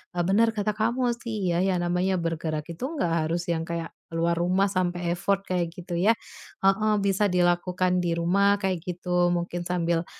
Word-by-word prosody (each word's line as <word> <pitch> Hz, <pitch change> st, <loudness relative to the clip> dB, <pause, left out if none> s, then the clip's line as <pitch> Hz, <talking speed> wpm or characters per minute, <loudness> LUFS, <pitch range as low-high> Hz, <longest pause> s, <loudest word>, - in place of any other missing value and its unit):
eee, 175 Hz, -, +1 dB
bener 225 Hz, +4 st, +4 dB
kata 210 Hz, -1 st, -1 dB
kamu 240 Hz, +3 st, +1 dB
sih 220 Hz, -6 st, -3 dB
ya, -, -, +2 dB
ya 190 Hz, -1 st, +1 dB
namanya 180 Hz, +2 st, +1 dB
bergerak 160 Hz, -2 st, -3 dB
itu 170 Hz, -, -8 dB, 0.2 s
nggak 170 Hz, -1 st, +1 dB, 0.2 s
harus 175 Hz, +1 st, -2 dB
yang 165 Hz, -1 st, -1 dB
kayak 165 Hz, 0 st, -4 dB, 0.2 s
ke -, -, -16 dB
luar 170 Hz, 0 st, +1 dB
rumah 185 Hz, +3 st, +2 dB
sampai 175 Hz, -2 st, -1 dB
effort 195 Hz, +2 st, +1 dB
kayak 175 Hz, -2 st, -1 dB
gitu 175 Hz, -1 st, -5 dB
ya. 205 Hz, +6 st, +4 dB, 0.5 s
Heeh, 210 Hz, +3 st, +3 dB
bisa 200 Hz, +1 st, +2 dB
dilakukan 180 Hz, +1 st, +2 dB
di 170 Hz, -1 st, 0 dB
rumah 200 Hz, +4 st, +3 dB
kayak 190 Hz, -2 st, 0 dB
gitu. 180 Hz, 0 st, 0 dB
Mungkin 175 Hz, 0 st, -3 dB
sambil, 170 Hz, -1 st, 0 dB
180 Hz, 180 wpm, -26 LUFS, 170-195 Hz, 0.5 s, bener